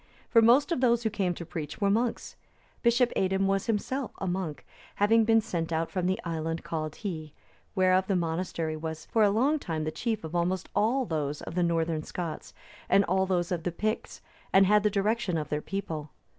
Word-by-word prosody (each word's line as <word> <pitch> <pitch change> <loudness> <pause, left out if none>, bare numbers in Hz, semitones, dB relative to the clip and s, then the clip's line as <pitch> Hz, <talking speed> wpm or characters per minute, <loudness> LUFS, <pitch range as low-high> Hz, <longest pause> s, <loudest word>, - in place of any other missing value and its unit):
For 230 - +7
most 245 +9 +5
of 295 - 0
those 235 -2 +3
who 220 - 0
came 190 -5 -1
to 170 - -7
preach 155 -3 -6
were 200 -1 +2
monks. 230 +3 -1 0.5
Bishop 240 +1 +3
Aidan 190 +1 +1
was 195 0 0
himself 235 +4 -1
a - - -4
monk, 180 -4 -3 0.3
having 220 +2 +4
been 225 0 +5
sent 170 -6 -3
out 165 0 -1
from 180 -2 -1
the 185 - 0
island 165 -1 -3
called 155 -2 -3
Hii,(299) 160 -7 -5 0.4
whereof 185 0 +3
the 195 - +1
monastery 165 -2 -2
was 160 0 -5
for 225 - +1
a 210 - +6
long 265 +9 +2
time 160 - -3
the 155 - -2
chief 220 +4 -2
of 160 +1 -7
almost 175 +1 -1
all 235 +6 +2
those 150 -5 -3
of - - -7
the 180 - 0
northern 165 -2 +1
Scots,(300) 165 0 -8
and 200 0 +5
all 190 +1 +1
those 175 -2 0
of 175 -2 -1
the 175 - -2
Picts, 215 +6 -3 0.3
and 195 0 +6
had 210 +2 +5
the 210 - +2
direction 205 -2 0
of 150 -1 -3
their 150 0 -1
people. 160 -6 -4
185 Hz, 205 wpm, -28 LUFS, 165-215 Hz, 0.5 s, For